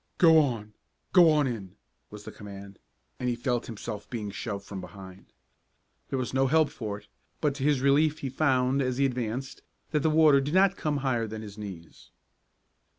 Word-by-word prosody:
"Go 165 -2 +7
on! 115 -8 -1 0.4
Go 175 -3 +8
on 150 -2 +3
in!" 110 -8 -5 0.3
was 105 0 -10
the - - -8
command 100 -1 -11 0.4
and 125 - -1
he 120 - 0
felt 120 0 -2
himself 105 -2 -7
being 105 -4 -4
shoved 100 -1 -5
from 95 -2 -7
behind. 95 +1 -12 0.8
There 135 - -1
was 130 -1 -3
no 135 +1 +3
help 155 +1 +3
for 105 -4 -5
it, 105 0 -17 0.3
but 150 -3 +1
to 135 -1 -6
his 145 -2 +2
relief 145 +3 +3
he 135 - -3
found, 130 -1 +2
as 130 -1 -1
he 140 - +3
advanced, 125 0 -3 0.3
that 150 - +2
the 155 - +2
water 155 -3 +5
did 145 +5 -2
not 195 0 +5
come 150 -2 -1
higher 120 -4 +1
than 110 0 -7
his 100 -2 -9
knees. 95 -6 -10
125 Hz, 190 wpm, -28 LUFS, 105-145 Hz, 0.8 s, Go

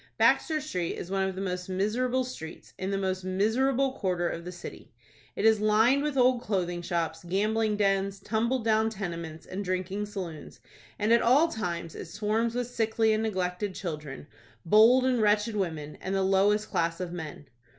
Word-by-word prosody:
Baxter 315 -2 +3
Street 180 - -3
is 180 - -7
one 195 0 +1
of 190 - -6
the 190 - -4
most 180 -1 -3
miserable 240 +7 0
streets 165 -11 -9
in 190 - -2
the 200 - 0
most 190 -1 -2
miserable 245 +8 +1
quarter 180 -7 -1
of 170 0 -5
the 180 - -5
city. 175 -1 -10 0.4
It 210 - -1
is 220 -1 +5
lined 220 +6 +4
with 295 -2 -2
old 250 -1 +4
clothing 175 -5 -2
shops, 170 -2 -2
gambling 210 +4 0
dens, 195 -1 +1
tumble 225 +5 0
down 220 0 +2
tenements, 170 -6 -6
and 195 +2 -5
drinking 185 +2 -2
saloons, 180 -7 -7 0.4
and 215 +2 +2
at 235 - +5
all 285 +8 +4
times 170 - -4
it - - -7
swarms 215 +6 -1
with 245 0 0
sickly 225 -2 +1
and 215 - +1
neglected 190 -2 -2
children, 150 -6 -6 0.4
bold 225 +8 +6
and 250 -3 +2
wretched 210 +1 +2
women, 160 -7 -3
and 190 +1 -2
the 195 - +1
lowest 200 +3 +2
class 165 0 0
of 180 -2 -4
men. 155 -4 -7
200 Hz, 180 wpm, -28 LUFS, 180-225 Hz, 0.4 s, bold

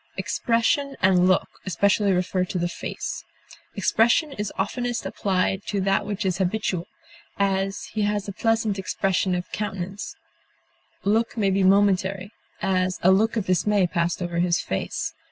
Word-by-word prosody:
Expression 270 +4 0
and 185 -1 +4
look 185 0 +3 0.2
especially 200 +2 +2
refer 185 0 +1
to 185 0 -3
the 175 0 0
face. 175 - -5 0.5
Expression 235 - +2
is 210 -4 -4
oftenest 240 +4 -2
applied 190 0 0
to 205 - -1
that 195 +1 +1
which 205 -1 -3
is 185 -1 0
habitual; 185 -2 -1 0.5
as, 195 0 0
he 215 - -1
has 205 0 0
a - - -3
pleasant 225 -1 0
expression 190 -1 0
of 180 0 -5
countenance; 195 -1 -4 0.9
look 225 +4 +1
may 200 -3 +2
be 195 +1 +2
momentary; 195 0 +2 0.3
as, 185 -1 +1
a 185 - +6
look 220 +4 +3
of 210 - -1
dismay 195 +2 +2
passed 170 +1 -1
over 175 -1 -2
his 175 -1 +2
face. 95 - -3
195 Hz, 150 wpm, -24 LUFS, 185-210 Hz, 0.9 s, a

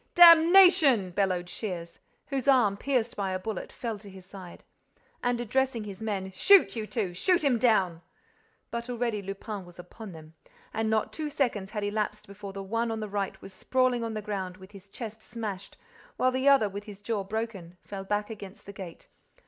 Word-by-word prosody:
"Damnation!" 335 - +8
bellowed 180 -2 0
Shears, 175 -4 -6 0.3
whose 275 -2 -2
arm, 245 -7 +5
pierced 245 0 -1
by 195 -2 -2
a - - 0
bullet, 205 0 -5
fell 225 -4 -5
to 205 0 -12
his 190 -1 -13
side. 185 -2 -11 0.6
And, 245 -1 0
addressing 245 0 0
his 205 0 -8
men, 195 -3 -3
"Shoot, 390 - +5
you 220 -2 -4
two! 210 -7 -2
Shoot 345 - +2
him 260 -5 +3
down!" 190 -9 +2 0.7
But 235 +1 -4
already 235 -3 -1
Lupin 195 +1 -6
was 175 -1 -15
upon 190 +4 -10
them: 160 0 -12 0.4
and 220 0 0
not 220 -1 0
two 310 -1 -3
seconds 240 -9 -1
had 210 -1 -4
elapsed 210 +1 -2
before 200 0 -9
the 195 0 -6
one 230 +4 -1
on 225 -1 -3
the 215 - -4
right 200 -1 -3
was 195 - -10
sprawling 255 +4 +1
on 225 -1 -3
the 215 - -4
ground, 190 -3 -4
with 190 +1 -14
his 195 -1 -14
chest 220 0 -8
smashed, 210 -5 -6 0.4
while 255 - +3
the 260 +2 +3
other, 275 -6 +5
with 200 +1 -7
his 205 -2 -10
jaw 205 -1 -2
broken, 195 -4 -5
fell 195 -1 -7
back 205 +2 -2
against 200 -3 -10
the 200 - -9
gate. 185 -4 -10
210 Hz, 190 wpm, -28 LUFS, 195-235 Hz, 0.7 s, Damnation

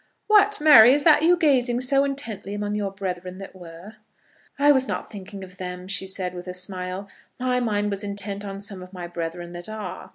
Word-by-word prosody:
] - - -49
"What, 420 0 +4
Mary, 265 -6 +8
is 290 0 +1
that 310 -1 +5
you 350 +3 +4
gazing 265 -7 +2
in 245 - -1
so 275 +2 +3
intently 235 -8 -5
among 205 0 -3
your 205 -1 -2
brethren 185 -2 -6
that 195 0 -10
were?" 175 +4 -12 0.6
"I 290 +1 +5
was 265 -2 +3
not - - -5
thinking 200 -1 -9
of 180 0 -13
them," 180 0 -7
she 190 0 -2
said, 185 -1 -1
with 180 0 -9
a 180 - -5
smile. 185 +1 -3 0.3
"My 250 0 0
mind 210 -3 -1
was 200 +1 -3
intent 200 0 -3
on 195 -1 -6
some 200 -2 -4
of 185 +1 -12
my 180 -2 -7
brethren 175 0 -6
that 175 +3 -7
are." 215 -4 -7
200 Hz, 220 wpm, -24 LUFS, 185-250 Hz, 0.6 s, Mary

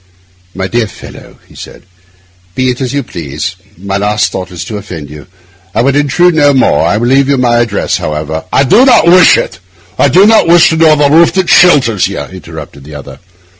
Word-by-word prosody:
'My 95 0 -4
dear 115 +1 -2
fellow,' - - -14
he - - -20
said, - - -12 0.7
'be 130 0 0
it 125 - -7
as 130 - -3
you 140 0 -3
please; 85 - -6 0.2
my 100 +2 -4
last 105 +1 -1
thought 90 -1 -6
is 90 -3 -8
to 105 - -6
offend 80 -8 -9
you. 75 +2 -12 0.5
I 115 - +1
would 135 +1 0
intrude 160 +4 +1
on 145 -2 +3
none. - - +2
I 105 - 0
will 115 - -2
leave 135 +2 +1
you 140 - +1
my 120 -2 +1
address, 115 -4 -2
however—' 75 +1 -5
'I 135 - +2
do 220 - +3
not 260 -9 +4
wish 180 +1 +5
it—I 90 +6 -5
do 180 +9 +3
not 220 -4 +3
wish 170 0 +4
to 160 - -1
know 160 -1 +4
the 145 -1 +2
roof 165 +3 +3
that 190 -1 -1
shelters 130 - +3
you,' 100 - -7
interrupted 80 -2 -10
the 75 +1 -12
other. 70 - -11
120 Hz, 205 wpm, -9 LUFS, 90-145 Hz, 0.7 s, wish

